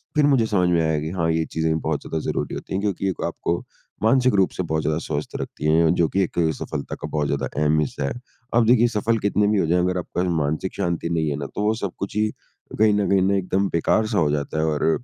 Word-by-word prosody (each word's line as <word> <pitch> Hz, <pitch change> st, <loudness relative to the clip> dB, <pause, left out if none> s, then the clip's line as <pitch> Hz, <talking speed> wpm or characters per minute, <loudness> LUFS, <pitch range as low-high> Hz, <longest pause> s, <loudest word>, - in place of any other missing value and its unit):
फिर 150 Hz, -, +4 dB
मुझे 135 Hz, -5 st, +4 dB
समझ 90 Hz, -5 st, +2 dB
में 85 Hz, -2 st, +3 dB
आया 80 Hz, -1 st, +1 dB
कि 80 Hz, +1 st, -4 dB
हाँ, 85 Hz, -3 st, 0 dB
ये 80 Hz, 0 st, 0 dB
चीज़ें 80 Hz, 0 st, -1 dB
बहुत -, -, -2 dB
ज़्यादा 80 Hz, -, -3 dB
ज़रूरी -, -, -2 dB
होती -, -, -7 dB
हैं 95 Hz, -, 0 dB
क्योंकि 100 Hz, -1 st, -1 dB
एक 95 Hz, -, -4 dB
आपको 85 Hz, -, -2 dB, 0.4 s
मानसिक 130 Hz, +2 st, +4 dB
रूप 95 Hz, -2 st, +4 dB
से 95 Hz, -, -3 dB
बहुत 80 Hz, -2 st, -1 dB
ज़्यादा 75 Hz, +1 st, 0 dB
स्वस्थ 75 Hz, -2 st, -4 dB
रखती -, -, -6 dB
है 80 Hz, 0 st, +4 dB
जो 85 Hz, -, +3 dB
कि 95 Hz, -, +1 dB
एक 85 Hz, -, -3 dB, 0.2 s
सफलता 75 Hz, -2 st, -4 dB
का -, -, -3 dB
बहुत 75 Hz, -1 st, -1 dB
ज़्यादा 70 Hz, -1 st, -1 dB
एक -, -, -9 dB
अहम 75 Hz, +1 st, +3 dB
हिस्सा 75 Hz, -1 st, -2 dB
है। -, -, -2 dB, 0.4 s
अब 120 Hz, -1 st, +5 dB
देखिए 120 Hz, 0 st, +5 dB
सफल 115 Hz, 0 st, 0 dB
कितने 100 Hz, 0 st, +2 dB
भी 105 Hz, -1 st, +2 dB
हो -, -, +2 dB
जाए 90 Hz, +2 st, +2 dB
अगर 90 Hz, +1 st, +1 dB
आपके 90 Hz, -, -4 dB
पास 90 Hz, -, 0 dB
मानसिक 75 Hz, +5 st, -1 dB
शांति 85 Hz, -3 st, -2 dB
नहीं 80 Hz, -2 st, 0 dB
है 70 Hz, -, -1 dB
ना, 70 Hz, -, -4 dB
तो 105 Hz, -, -5 dB
वो 105 Hz, +1 st, +2 dB
सब 100 Hz, -4 st, -3 dB
कुछ 100 Hz, +1 st, -5 dB
ही 110 Hz, 0 st, +2 dB, 0.5 s
कहीं 110 Hz, -1 st, +5 dB
न 105 Hz, -1 st, +1 dB
कहीं 95 Hz, -1 st, +4 dB
ना 100 Hz, +1 st, +2 dB
एकदम 95 Hz, +1 st, 0 dB
बेकार 110 Hz, +6 st, +1 dB
सा -, -, -1 dB
हो 75 Hz, -3 st, +2 dB
जाता 75 Hz, +1 st, -2 dB
है 80 Hz, -, +2 dB
और 80 Hz, +7 st, +1 dB
90 Hz, 265 wpm, -23 LUFS, 80-100 Hz, 0.5 s, अब